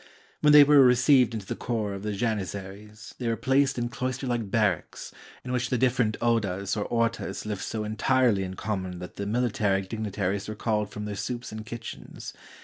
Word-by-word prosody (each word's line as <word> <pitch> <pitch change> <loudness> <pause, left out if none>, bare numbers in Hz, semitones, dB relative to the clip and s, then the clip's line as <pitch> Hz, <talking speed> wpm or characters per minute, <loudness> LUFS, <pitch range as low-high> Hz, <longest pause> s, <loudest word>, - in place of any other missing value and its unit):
When 150 - +5
they 150 0 +10
were 145 -1 +7
re 125 -1 +6
ceived 125 -2 +4
into 105 -3 -5
the - - -4
corps 110 -4 -2
of 100 - -6
the 105 0 -3
Janizaries, 105 0 -4
they 120 - -2
were 115 - +1
placed 135 +2 +2
in 120 0 -1
cloister 130 +2 -3
like 120 -5 -2
barracks, 105 -5 -1 0.3
in 125 - -4
which 125 -1 -1
the 125 - +1
different 125 -3 +1
odas 100 -5 0
or 105 - -2
orlas 115 -1 -1
lived 105 -2 -4
so 110 -1 -3
entirely 110 0 +2
in 95 0 -5
common 95 -3 -3
that 90 0 -9
the 100 - -3
military 105 -4 0
digni 110 +1 -4
taries 100 +1 -2
were 110 - -4
called 105 -1 -1
from 105 0 -6
their 105 - -4
soups 120 +4 -4
and 110 0 -7
kitchens. 115 0 -8
110 Hz, 200 wpm, -27 LUFS, 100-125 Hz, 0.3 s, they